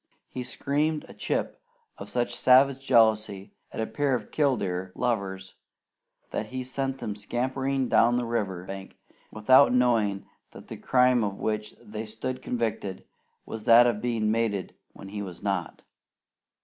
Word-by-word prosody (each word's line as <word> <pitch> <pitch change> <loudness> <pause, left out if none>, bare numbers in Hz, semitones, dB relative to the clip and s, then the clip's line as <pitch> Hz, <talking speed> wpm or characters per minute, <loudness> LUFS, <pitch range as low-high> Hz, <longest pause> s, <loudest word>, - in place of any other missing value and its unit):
He 130 - -5
screamed 150 +5 -1
a - - -12
"Chip" - - -3 0.4
of - - -8
such 120 -1 -1
savage 135 +1 +4
jealousy 110 -3 +2 0.2
at - - -7
a 110 - 0
pair 135 +4 0
of 110 -4 -6
killdeer 95 -11 0
lovers 95 -5 -2 0.8
that - - -3
he 130 0 -5
sent 135 +1 -2
them 105 -5 -5
scampering 130 +5 -2
down 120 +1 +4
the 125 0 0
river 100 -6 -2
bank 95 0 -8 0.3
without 130 +6 +5
knowing 115 -6 +2 0.3
that - - -13
the - - -7
crime 125 -2 +3
of 100 -2 -3
which 105 -1 -3
they 105 +1 -7
stood 130 +4 -5
convicted 110 -6 -3 0.4
was 110 -1 -7
that 115 +1 +8
of 115 -3 0
being 115 -3 0
mated 110 -4 -1 0.2
when 95 - -11
he 105 +1 -5
was 90 -4 -8
not. - - -3
115 Hz, 150 wpm, -27 LUFS, 105-130 Hz, 0.8 s, that